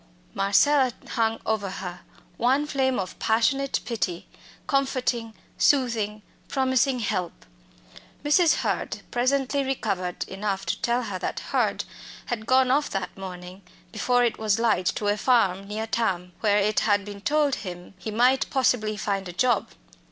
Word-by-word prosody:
Marcella 255 +8 +3 0.2
hung 225 -2 0
over 215 -3 -1
her, 180 -1 -6 0.4
one 265 +5 +2
flame 265 -3 0
of 185 -1 -4
passionate 250 +5 +1
pity, 185 -7 -3 0.4
comforting, 255 -5 0 0.2
soothing, 225 -6 +2 0.2
promising 260 -1 +1
help. 185 -5 -3 0.8
Mrs. 325 +3 +5
Hurd - - -2
presently 270 +3 +1
recovered 200 -9 -2
enough 195 0 -3
to - - -2
tell 245 -1 +1
her 200 -5 -4
that - - -3
Hurd - - +1 0.4
had 220 -2 -4
gone 260 0 +4
off 290 +2 +2
that 195 -2 -4
morning 185 0 -8 0.3
before 245 +3 +2
it 235 - 0
was 215 -1 +2
light 220 -6 +2
to 210 - -1
a 205 - +3
farm 200 -5 +2
near 215 +2 -3
Thame, 190 -6 -1
where 205 -2 +3
it 210 +1 +2
had 205 -2 +2
been 205 -1 -8
told 290 +1 +2
him 180 -2 -8
he 220 - -5
might 250 +5 +3
possibly 225 -5 +1
find 195 -2 -2
a - - -5
job. 240 +3 +2
220 Hz, 145 wpm, -25 LUFS, 195-260 Hz, 0.8 s, Mrs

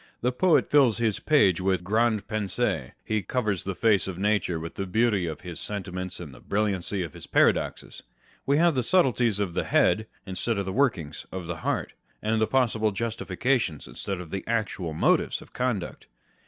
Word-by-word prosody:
The 125 - +1
poet 165 +6 +3
fills 135 -7 +5
his 115 -3 0
page 100 - +3
with 95 -1 +1
grandes 110 +2 +1
pensees. 105 - -1
He 110 -1 0
covers 105 -3 -1
the 95 -1 -3
face 105 -3 +3
of 95 -3 -5
nature 100 -4 +1
with 85 +1 -6
the 95 - -4
beauty 105 -2 +2
of 80 - -5
his 90 -2 -7
sentiments 90 -3 -5
and 80 -6 -8
the - - -13
brilliancy 100 -2 -1
of 80 - -7
his - - -10
paradoxes. - - +1 0.5
We 140 +1 +3
have 170 +1 +4
the 130 - +1
subtleties 125 - +3
of 100 -4 -1
the - - -1
head, 110 +1 +2 0.2
instead 100 +4 -2
of 100 - -1
the 95 - -3
workings 95 - 0
of 95 -2 -5
the 85 0 -4
heart, - - -2 0.3
and 110 0 0
possible 115 -4 +2
justifications 115 - -1
instead 95 -2 -5
of 85 -3 -9
the 95 - -3
actual 110 -7 -2
motives - - +2
of - - -16
conduct. 120 -8 -3
105 Hz, 180 wpm, -26 LUFS, 90-115 Hz, 0.5 s, fills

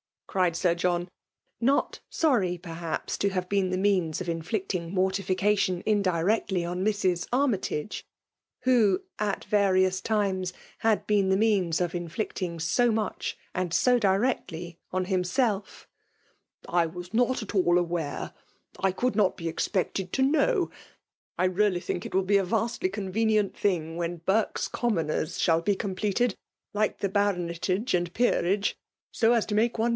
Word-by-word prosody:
cried 180 -4 +1
Sir 170 0 +2
John, 175 0 -1 0.5
not 270 +4 +1
sorry, 210 - +1
perhAps, 165 -1 -4
ib 200 - +2
have 185 -1 -2
tiepn 195 -2 +1
.the 185 - -1
rooana 185 -5 +1
of 175 - -4
inflicting 170 +1 -3
mortificalioil 190 0 +1
indirectly 195 -1 +1
pn 175 +1 -3
Mrs. 185 -4 0
Army 255 -4 +3
tage, 165 0 -4 0.6
who, 220 -7 +3 0.2
at 205 -2 -1
vuxui^B 185 -2 +3
times^ 190 -4 0 0.3
had 220 -2 +1
been 200 -2 +2
the 190 - +3
means 195 -6 +2
of 175 -1 -1
inflicting 175 0 -3
^so 235 +9 +2
much 215 -2 -2 0.2
and 180 -2 -2
.so 250 +4 +4
dircfctly 190 -5 0
on 185 0 0
himself; 195 +3 -1 0.8
''I 175 -1 +3
wa&noft 220 +8 -1
at - - -11
jEdl 190 -3 +1 0.2
awfire, 165 -4 -4 0.2
— - - -25
I 190 - +4
could 245 +2 -1
not 200 -4 +3
be 165 -1 -4
expected 185 +1 -2
to 265 - +1
knoNV 320 - +2 0.7
I - - +1
really 185 0 +2
think 175 - -3
it - - -5
will 190 - +3
.be 200 +2 +3
a 195 - +1
va&dgr 225 -1 -1
convenient 210 +1 0
thing 165 -5 -1
when 170 -1 -3
\ - - -45
Burke 215 +3 +2
s. - - -1
Commoners' 165 -9 -1
shall 165 -1 +3
be 200 +3 +1
completed, 205 +3 -1 0.4
like 210 0 0
the. 200 - 0
Baronetage 190 +2 0
and 175 -1 +1
Peerage, 205 -4 +1 0.4
so 230 0 +3
as 230 -3 +2
to 210 - -3
make 225 +3 +2
one. 225 +2 +2
190 Hz, 155 wpm, -27 LUFS, 175-215 Hz, 0.8 s, so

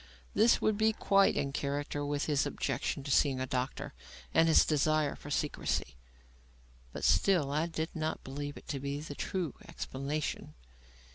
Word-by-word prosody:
This 225 +3 +5
would 215 -1 +1
be 220 0 +4
quite 195 -2 +3
in 140 - -1
character 145 +1 -2
with 145 0 -1
his 145 -3 +1
objection 135 +1 -2
to 140 - -4
seeing 135 -1 +3
a 130 - -1
doctor 130 +2 -3 0.4
and 165 - +5
his 160 - +6
desire 155 -1 +2
for 145 - -10
secrecy. 145 - -1 1.0
But - - -7
still, 170 -8 +3
I 155 +3 +1
did 160 0 -4
not 160 0 -2
believe 145 +2 -5
it - - -13
to 140 - -2
be 140 +1 -3
the 150 -1 -6
true 170 0 -3
explanation. 140 +3 -4
145 Hz, 160 wpm, -32 LUFS, 140-160 Hz, 1.0 s, his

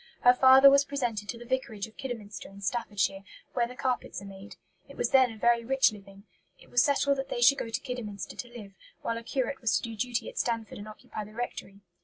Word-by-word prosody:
Her 245 - +7
father 265 +2 +8
was 280 0 +5
presented 240 -7 -3
to 235 - -3
the 240 - -11
vicarage 240 -5 -2
of 220 - -16
Kidderminster 225 -6 -7
in 195 +1 -13
Staffordshire, 200 -3 -1 0.3
where 240 -2 +1
the 250 - -10
carpets 255 -6 -2
are 200 - -11
made. 195 +1 -11 0.3
It - - -13
was - - 0
then 260 -3 +5
a - - -12
very 235 +1 +3
rich 265 +1 +3
living. 195 -1 -13 0.4
It - - -19
was 245 - +5
settled 280 -1 +2
that 270 - -4
they - - -3
should 275 +3 +6
go 230 - -4
to 225 - -2
Kidderminster 225 -7 -6
to 245 - -6
live, 225 -5 -11 0.3
while 230 0 -2
a - - -12
curate 260 +3 -2
was 230 -2 +2
to - - -5
do 230 -1 -5
duty 240 +2 -2
at - - -6
Stanford 230 -3 -2
and 205 - -8
occupy 215 0 -8
the 210 +1 -13
rectory. 205 -4 -6
235 Hz, 235 wpm, -29 LUFS, 210-255 Hz, 0.4 s, father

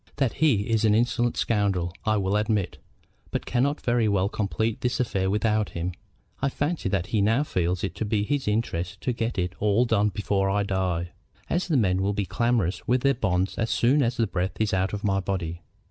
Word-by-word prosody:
That 135 -4 0
he 140 -10 +4
is 115 -1 +1
an 105 -1 +4
insolent 120 +1 +1
scoundrel 100 -6 0
I 110 0 +2
will 95 0 0
admit; 105 -2 0 0.5
but - - -3
we - - -9
cannot 140 +4 +1
very 120 -3 +2
well 100 -1 +2
complete 110 +2 -2
this 125 -1 -1
affair 95 -6 0
without 105 +1 +1
him. 85 +2 -2 0.5
I 135 - +2
fancy 145 - -2
that 95 -2 0
he 105 - +3
now 115 +7 +3
feels 90 - -1
it 100 - -2
to - - -1
be 105 0 0
his 140 +3 -1
interest 100 -4 -1
to 125 - -1
get 115 0 -2
it 90 -1 -1
all 105 +3 +3
done 105 -3 +2
before 100 -1 0
I 100 +1 +1
die, 90 -3 -1 0.4
as 180 +2 0
the 160 -5 +2
men 95 -5 +2
will 100 +1 +1
be 100 -1 -1
clamorous 115 -5 0
with 125 +1 +2
their 140 +1 +3
bonds 95 -6 -1
as 115 -1 0
soon 135 +5 +3
as 120 -2 0
the 115 - +2
breath 95 -2 -3
is 110 -3 0
out 95 +1 +1
of 105 -1 -5
my 100 -2 +2
body. 90 -3 -3
105 Hz, 215 wpm, -26 LUFS, 95-120 Hz, 0.5 s, he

